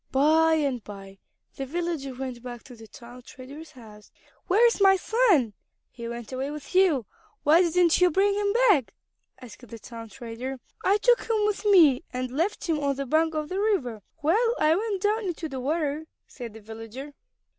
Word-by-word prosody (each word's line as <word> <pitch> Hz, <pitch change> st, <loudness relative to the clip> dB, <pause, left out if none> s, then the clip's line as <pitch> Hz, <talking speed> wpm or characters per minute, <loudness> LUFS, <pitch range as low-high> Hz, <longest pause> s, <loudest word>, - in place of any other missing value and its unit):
By 320 Hz, +4 st, +4 dB
and 275 Hz, -7 st, -1 dB
by 195 Hz, -1 st, -11 dB, 0.4 s
the 270 Hz, -, -4 dB
villager 320 Hz, -4 st, -3 dB
went 255 Hz, -2 st, -6 dB
back 240 Hz, -2 st, -8 dB
to 250 Hz, -, -13 dB
the 225 Hz, -1 st, -14 dB
town 240 Hz, +3 st, -13 dB
trader's 275 Hz, +6 st, -12 dB
house. 215 Hz, -4 st, -15 dB, 0.4 s
"Where 425 Hz, +6 st, +4 dB
is 465 Hz, -3 st, +2 dB
my 390 Hz, -1 st, +6 dB
son? 380 Hz, -, +2 dB, 0.4 s
He 235 Hz, -1 st, -8 dB
went 235 Hz, -1 st, -7 dB
away 265 Hz, +2 st, -3 dB
with 295 Hz, +2 st, -9 dB
you. 355 Hz, -, +3 dB, 0.4 s
Why 315 Hz, +4 st, +5 dB
didn't 350 Hz, -1 st, +3 dB
you 360 Hz, -, +6 dB
bring 390 Hz, +4 st, +2 dB
him 405 Hz, 0 st, 0 dB
back?" 415 Hz, -, +3 dB, 0.4 s
asked 245 Hz, 0 st, -13 dB
the 230 Hz, -, -9 dB
town 230 Hz, 0 st, -10 dB
trader. 245 Hz, +3 st, -7 dB, 0.2 s
"I 395 Hz, +2 st, +3 dB
took 480 Hz, +2 st, +2 dB
him 435 Hz, -2 st, +2 dB
with 420 Hz, 0 st, -2 dB
me 330 Hz, -11 st, +6 dB
and 255 Hz, 0 st, -4 dB
left 335 Hz, +11 st, -2 dB
him 320 Hz, -3 st, 0 dB
on 280 Hz, -1 st, 0 dB
the 275 Hz, +1 st, -4 dB
bank 315 Hz, +4 st, +1 dB
of 305 Hz, -1 st, -3 dB
the 375 Hz, -, -3 dB
river 290 Hz, -, -1 dB, 0.2 s
while 445 Hz, +10 st, +2 dB
I 310 Hz, +1 st, +4 dB
went 405 Hz, -1 st, -2 dB
down 425 Hz, +1 st, +1 dB
into 345 Hz, -3 st, -4 dB
the 270 Hz, -3 st, -6 dB
water," 300 Hz, +2 st, -2 dB, 0.2 s
said 235 Hz, -4 st, -9 dB
the 220 Hz, -, -11 dB
villager. 225 Hz, +6 st, -9 dB
295 Hz, 190 wpm, -26 LUFS, 250-370 Hz, 0.4 s, my